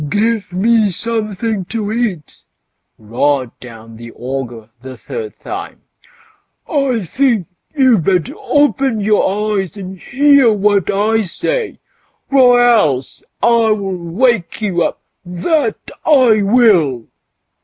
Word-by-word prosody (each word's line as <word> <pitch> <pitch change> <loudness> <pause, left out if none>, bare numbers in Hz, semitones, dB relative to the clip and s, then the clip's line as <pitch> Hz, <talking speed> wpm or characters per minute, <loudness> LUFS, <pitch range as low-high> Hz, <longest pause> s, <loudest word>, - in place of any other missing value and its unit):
"Give 220 +3 -1
me 215 +3 +2
something 215 0 -3
to 215 +1 -4
eat!" 215 - -3 0.6
roared 125 +4 -1
out 115 -2 -12
the 115 0 -10
ogre 120 -4 -6
the 130 0 -10
third 455 -3 -7
time." - - -7 0.9
I 265 - -1
think 235 - 0 0.3
you'd 255 - +3
better 180 -5 0
open 270 -5 0
your 210 0 +1
ears 190 +2 -5
and 190 -1 -8
hear 275 -1 +3
what 205 -2 +1
I 215 +3 +1
say, 470 - -3 0.5
or 250 -3 +5
else 205 - +2 0.2
I'll 230 -2 +3
wake 195 +2 -1
you 195 -5 -1
up, - - -2 0.2
that 290 - -1 0.3
I 255 -8 +4
will!" 195 - +3
210 Hz, 110 wpm, -15 LUFS, 170-240 Hz, 0.9 s, or